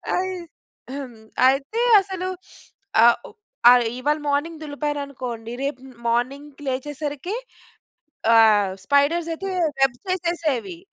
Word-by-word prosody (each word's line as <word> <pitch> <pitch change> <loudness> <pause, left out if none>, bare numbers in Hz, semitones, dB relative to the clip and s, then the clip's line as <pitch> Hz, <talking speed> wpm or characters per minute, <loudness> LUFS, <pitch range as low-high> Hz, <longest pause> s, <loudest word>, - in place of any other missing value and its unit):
అయి 370 0 -1 1.1
అయితే 275 - +1 0.2
అసలు 375 -1 -5 0.8
ఆహ్, 235 0 +7 0.5
ఆహ్, 250 -1 +6 0.2
ఇవాళ 295 +4 +1
మార్నింగ్ 315 +3 -1
దులిపాననుకోండి 280 -6 -4
రేపు 275 -2 -3
మ్ 255 - -16
మార్నింగ్‌కి 275 +5 -2
లేచేసరికి 290 +6 -3 1.0
ఆహ్, 210 -4 +5
స్పైడర్స్ 310 +6 +2
అయితే 390 +4 -5 0.3
వెబ్స్ 260 -3 +2
యేసేసేవి. 340 -2 -2
285 Hz, 95 wpm, -23 LUFS, 255-330 Hz, 1.1 s, ఆహ్